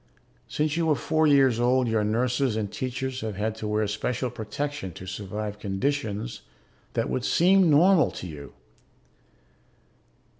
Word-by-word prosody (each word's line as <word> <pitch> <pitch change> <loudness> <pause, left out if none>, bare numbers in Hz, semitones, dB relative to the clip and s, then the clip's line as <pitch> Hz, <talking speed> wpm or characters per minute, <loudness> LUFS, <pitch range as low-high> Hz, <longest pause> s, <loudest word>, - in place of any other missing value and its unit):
Since 150 +1 -1
you 165 -1 +1
were 155 - +3
four 155 +2 +1
years 135 -5 +4
old 125 +1 +2
your 110 -2 +1
nurses 125 +3 0
and 105 -2 -2
teachers 130 0 -4
have 110 -2 -4
had 105 +2 -1
to 110 - -4
wear 105 0 +1
special 125 +4 -2
protection 125 - -5
to 95 - -10
survive 105 +2 -5
conditions 105 - -2 0.5
that - - 0 0.2
seem 185 +3 +4
normal 160 0 +5
to - - -8
you. 75 -4 -9
125 Hz, 140 wpm, -26 LUFS, 105-145 Hz, 0.5 s, normal